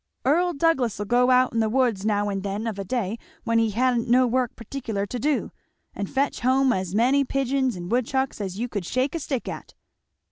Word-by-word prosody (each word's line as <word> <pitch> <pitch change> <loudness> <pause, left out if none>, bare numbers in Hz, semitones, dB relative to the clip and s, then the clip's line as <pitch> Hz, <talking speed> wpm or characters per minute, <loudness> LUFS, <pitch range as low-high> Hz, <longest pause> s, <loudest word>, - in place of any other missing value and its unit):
"Earl 345 +6 +3
Douglass'll 265 -10 +1
go 245 +3 +3
out 255 -1 +4
in 230 - 0
the 220 -1 +2
woods 235 -5 +1
now 205 -1 +1
and 195 -1 -2
then, 200 +3 -3
of 215 -3 -3
a - - -2
day 220 +1 -2 0.2
when 230 0 +2
he 225 -1 +2
ha'n't 240 +2 +1
no 255 +1 +5
work 245 0 0
particular 225 -4 -4
to 245 +5 -5
do, 295 +3 0 0.4
and 200 -1 -4
fetch 275 +1 0
hum 260 +1 +3
as 185 0 -3
many 260 +5 +4
pigeons 265 -2 0
and 175 +2 -7
woodchucks 255 0 0
as 190 -1 -4
you 240 +3 -2
could 205 -7 -4
shake 255 +2 0
a 335 - -2
stick 275 -4 -3
at." - - -7
240 Hz, 210 wpm, -24 LUFS, 205-265 Hz, 0.4 s, no